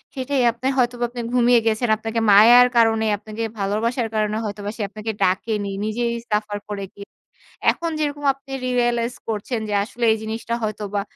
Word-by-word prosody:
সেটাই। 265 0 -1
আপনার 255 +3 -2
হয়তোবা 245 -1 +1
আপনি 240 0 -6
ঘুমিয়ে 245 -1 +5
গেছেন। 225 +2 +1
আপনাকে 225 +1 -3
মায়ার 235 +5 +8
কারণে 225 -1 +3
আপনাকে 215 +2 -6
ভালোবাসার 225 +4 -1
কারণে 215 0 0
হয়তোবা 205 0 -5
সে - - -5
আপনাকে 215 +2 -5
ডাকেনি। 205 +3 0 0.2
নিজেই 235 +2 -1 0.2
সাফার 210 0 -1
করে 200 -1 -4
গিয়ে 200 0 -11 0.6
এখন 335 -1 -1
যেরকম 290 -1 -2
আপনি 275 0 -16
রিয়েলাইজ 240 -1 0
করছেন 225 +2 -3
যে - - -2
আসলে 235 +3 -7
এই 220 - +1
জিনিসটা 225 +2 -4
হয়তোবা 210 -1 -2
225 Hz, 160 wpm, -22 LUFS, 210-245 Hz, 0.6 s, মায়ার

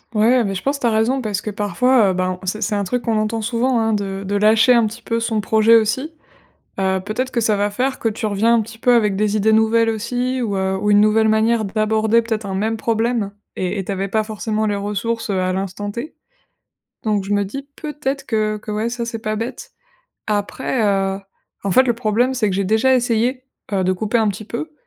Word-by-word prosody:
Ouais, 235 +4 +4
beh, 195 -2 -2
je 185 - -5
pense 280 +1 -1
tu 245 - +1
as - - +3
raison 225 +4 +1
parce 210 -4 -2
que, 215 - -5
parfois, 210 +3 +2
heu - - +1
ben, 185 0 -1
c'est 195 +4 -3
c'est 210 - -1
un 205 -1 0
truc 245 +6 -2
qu'on 225 -2 0
entend 215 +1 -2
souvent, 240 +2 +1
hein, 225 0 +1
de 195 -1 -3
de 200 +2 -2
lâcher 220 +4 +5
un 235 -2 +4
petit 225 +3 -9
peu 230 0 -1
son 225 -1 -1
projet 220 +2 +4
aussi. 230 +7 +1 0.7
Heu, 190 0 +1
peut-être 250 +5 -3
que 235 - +1
ça 215 -2 +2
va 205 +1 +1
faire 255 +6 -2
que 225 - 0
tu 220 +1 -3
reviens 215 +3 +2
un 230 - +4
petit 225 +1 -11
peu 245 +1 +3
avec 210 -4 +2
des 210 +1 +1
idées 215 +1 +2
nouvelles 220 +1 +3
aussi 245 +4 -2
ou, 210 -5 -1
heu, 190 0 0
ou 210 +1 +2
une 205 - +6
nouvelle 215 +1 +4
manière 220 +1 +2
d'aborder 220 +2 +1
peut-être 220 -2 -3
un 195 - -4
même 220 +4 -1
problème. 225 -2 -1 0.2
Et 185 +2 -2
et - - -5
tu - - -5
avais 195 0 -2
pas 215 +2 0
forcément 215 0 -2
les 205 -1 0
ressources, 210 +3 -3
heu, 190 -2 0
à 185 0 0
l'instant 195 +2 -4
T. 240 +9 -6 0.9
Donc, 210 -3 0
je 200 +2 -2
me 205 0 +2
dis 275 +8 -7
peut-être 290 -3 -4
que 215 -2 0
que, 215 - -11
ouais, 215 +2 -1
ça, 240 0 -4
c'est 230 0 -4
pas 215 -1 -2
bête. 230 +3 -6 0.6
Après 215 +4 -1
heu, 195 -1 0 0.4
en 200 - -1
fait, 260 +8 +5
le 240 -2 +1
problème, 235 +3 +1
c'est 220 -5 +1
que 185 - -2
j'ai 200 - 0
déjà 220 +6 +3
essayé, 245 +2 0 0.3
heu, 190 -2 +1
de 185 - +2
couper 215 +5 0
un 220 - +2
petit 205 +1 -3
peu, 245 +9 -6
220 Hz, 235 wpm, -19 LUFS, 205-235 Hz, 0.9 s, une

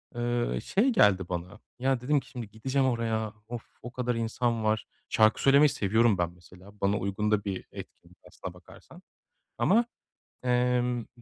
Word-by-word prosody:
ııı, 120 - -1
şey 220 +8 +2
geldi 95 - +3
bana, 90 +4 -5 0.2
ya, 130 -1 +1
dedim 145 +3 +2
ki, - - -18
"Şimdi 120 -4 -7
gideceğim 130 +5 0
oraya, 110 -3 -1
of, 120 -1 -6 0.2
o 120 - -8
kadar 125 -1 -2
insan 115 0 -1
var." 110 0 +1 0.2
Şarkı 110 0 +3
söylemeyi 140 +2 +6
seviyorum 110 -1 +2
ben, 85 -1 0
mesela, 90 +3 -17
bana 100 +1 +2
uygun 100 +2 -1
da 105 -1 +2
bir 95 -2 -4
etkinlik - - -12
aslına - - -8
bakarsan - - -16 0.6
ama, 230 +5 +4 0.6
ımm, 125 -1 +1
115 Hz, 155 wpm, -28 LUFS, 105-125 Hz, 0.6 s, söylemeyi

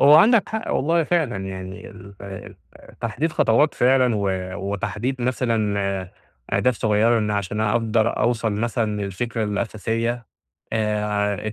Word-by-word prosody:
هو 145 +2 +8
عندك 220 +7 +6
حق 220 +1 -3
والله 165 +4 +2
فعلًا، 155 - 0
يعني 95 +1 -7
ال 100 0 -13
ال 100 -1 -8 0.5
تحديد 145 +8 -1
خطوات 140 +7 +3
فعلًا، 125 -1 +3
و 100 - -1 0.5
وتحديد 120 +6 -3
مثلًا 105 -7 0 0.4
أهداف 125 -1 +2
صغيّرة 110 +2 +2
لأن 105 -2 +1
عشان 100 +1 -2
أقدر 110 +1 +1
أوصل 115 -2 +1
مثلًا 110 -1 -1
للفكرة 110 +4 -2
الأساسية، 115 +3 -2 0.5
آآ 105 -1 -1
110 Hz, 125 wpm, -22 LUFS, 105-120 Hz, 0.5 s, هو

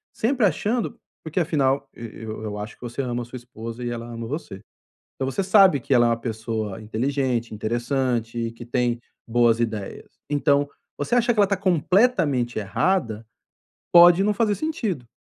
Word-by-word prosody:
sempre 240 0 +2
achando 225 +4 -1 0.3
porque 160 +3 -2
afinal 140 -5 +1
e 115 -2 -9
eu 110 0 -6
eu 105 -1 -4
acho 105 +1 -7
que - - -38
você 120 +2 -4
ama 120 -2 -2
a - - -8
sua 125 +2 -8
esposa 115 -1 -8
e 120 - -2
ela 120 -1 -5
ama 115 -1 -6
você. 145 - -5 0.6
Então, 135 - -2
você 195 - -1
sabe 190 - +5
que 135 - -4
ela 120 -1 +5
é - - +3
uma 115 - +2
pessoa 110 -3 -4
inteligente, 120 0 -1
interessante, 120 0 -1
que 115 +1 -10
tem 120 -1 0 0.3
boas 120 -1 +3
ideias. 110 -4 -4
Então, 145 -1 +2 0.3
você 145 +11 -1
acha 240 0 +3
que - - -8
ela 200 - +6
tá 200 0 0
completamente 175 - +2
errada? 115 - 0 0.7
Pode 175 +1 +8
não 210 - +2
fazer 210 0 +2
sentido. 210 - -3
125 Hz, 175 wpm, -24 LUFS, 115-175 Hz, 0.7 s, Pode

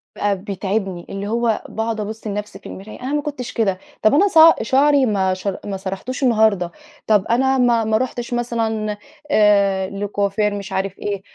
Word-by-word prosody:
بقى 205 -1 0
بيتعبني، 195 -2 -3
اللي 195 +1 -5
هو 230 0 0
باقعد 225 0 -3
أبصّ 215 +1 -5
لنفسي 205 -1 -5
في - - -28
المرايا 205 +5 -10
"أنا 260 +3 -3
ما 295 - +1
كنتش 285 -4 -6
كده، 195 -5 0 0.2
طب 215 - +5
أنا 380 +8 +5
ص 375 - -1 0.2
شعري 275 +4 +3
ما 195 -4 +1
شر 185 +1 -4
ما 200 -1 -3
سرحتوش 195 +8 -5
النهارده، 215 -7 +3 0.4
طب 210 -3 +3
أنا 265 +3 +2
ما 240 -2 +3
ما 220 0 +1
رحتش 245 0 -3
مثلًا 225 -3 -2 0.3
آآ، 200 -3 +3
لكوافير 205 +1 -1
مش 200 -1 -6
عارف 190 0 -3
إيه 200 -2 -3
215 Hz, 175 wpm, -20 LUFS, 195-235 Hz, 0.4 s, طب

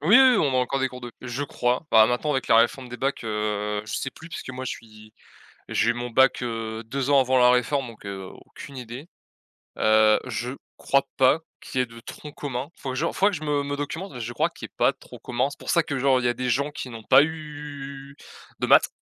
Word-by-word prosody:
Oui 180 - +6
oui 260 -3 +7
on 145 -7 +2
a - - +3
encore 130 +2 +1
des 130 - +1
cours 125 0 -10
de 120 -1 -7
je 125 +3 -4
crois, 125 0 -1
bah, 110 -1 +7
maintenant 125 +5 0
avec 135 -3 -1
la 115 - +6
réforme 125 +3 +2
des 125 - -7
bacs, 135 -2 -2
heu, 105 -1 -2
je 105 - -7
sais 135 - -2
plus, 160 - -13
puisque 160 - -7
moi, 130 0 -6
je - - -3
suis 110 -1 -11 0.6
j'ai 120 - +2
eu - - 0
mon 120 0 -4
bac 130 +1 +4
heu, 115 -1 -4
2 135 +3 -3
ans 140 - +6
avant 130 0 +3
la 125 0 +6
réforme 125 +2 +1
donc 115 -3 -13
heu, 95 -1 -6 0.2
aucune 140 - -11
idée. 125 +6 -8 0.7
Heu, 110 0 +5
je 120 +1 -3 0.3
crois 140 -1 +1
pas 135 +4 +5 0.2
qu'il 130 - -4
y - - +5
ait - - -3
de 115 0 -12
tronc 150 +5 -9
commun, 135 -1 -4
faut 135 - -6
que 130 - -3
je 155 +5 0
faudrait 200 +2 +3
que 180 - -3
je 155 - -9
me 145 -1 +1
me 145 0 -3
documente, 160 +6 -4
mais 125 - -8
je 120 +1 -5
crois - - +1
qu'il - - -9
est - - -44
pas - - +4
trop - - -13
commun. 125 +2 -1
C'est - - -12
pour - - -9
ça 170 - +4
que, 140 -3 -3
genre 130 0 +3
il 125 - -3
y - - +4
a - - +1
des 125 +1 -2
gens 140 +4 +1
qui 130 - -6
n'ont 115 -2 -9
pas 135 +5 +7
eu 145 -3 -7 0.4
de - - -1
maths, - - +6
130 Hz, 260 wpm, -25 LUFS, 115-140 Hz, 0.7 s, oui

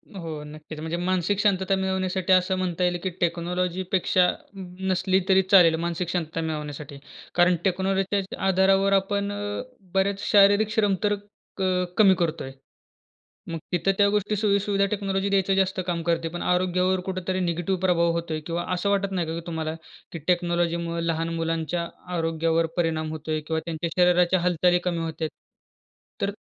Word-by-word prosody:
हो, 160 -5 -6
नक्कीच. 155 +1 -10
म्हणजे 160 +2 -3
मानसिक 185 +2 0
शांतता 195 -1 +2
मिळवण्यासाठी 190 -1 0
असं 185 +1 +3
म्हणता 180 -1 -1
येईल, 175 0 +1
की 190 - 0
टेक्नॉलॉजीपेक्षा 180 +1 +1 0.3
नसली, 185 0 -1
तरी 190 0 +6
चालेल 175 -5 +7
मानसिक 170 0 -2
शांतता 165 -2 -2
मिळवण्यासाठी. 150 -3 -5 0.4
कारण 175 0 +5
टेक्नॉलॉजीच्या 195 +1 +1 0.3
आधारावर 195 +1 +3
आपण 200 +1 +1
अ, 205 0 -4 0.3
बरेच 195 +1 +1
शारीरिक 205 +1 +5
श्रम 205 -3 +2
तर 205 0 +2 0.4
क 195 - -5 0.4
कमी 200 -3 +7
करतोय. 160 -5 -2 1.0
मग 165 - -3
तिथं 180 +2 +2
त्या 205 - +5
गोष्टी 210 0 0
सोयीसुविधा 200 -1 +1
टेक्नॉलॉजी 195 -1 -1
द्यायचं 195 -1 +2
जास्त 190 -1 +1
काम 170 -1 -1
करते. 165 0 0
पण 175 +1 -6
आरोग्यावर 180 +1 +1
कुठेतरी 185 0 -2
निगेटिव्ह 175 +1 -1
प्रभाव 170 -2 +3
होतोय 165 -2 -3
किंवा 170 +1 -2
असं 180 +3 -1
वाटत 200 -1 +1
नाही 175 -3 -1
का 160 - -3
की 170 - -12
तुम्हाला, 160 -1 -3 0.4
की 165 - -6
टेक्नॉलॉजीमुळं 170 -1 0
लहान 165 0 -1
मुलांच्या 165 +1 -2 0.3
आरोग्यावर 165 0 +1
परिणाम 160 -2 0
होतोय 155 0 -3
किंवा 160 -1 0
त्यांच्या 170 0 -3
शरीराच्या 180 +1 +4
हालचाली 175 0 +2
कमी 175 -2 0
होत 160 0 -6
आहेत? 160 - 0 0.9
तर 200 - 0
180 Hz, 150 wpm, -25 LUFS, 165-190 Hz, 1.0 s, चालेल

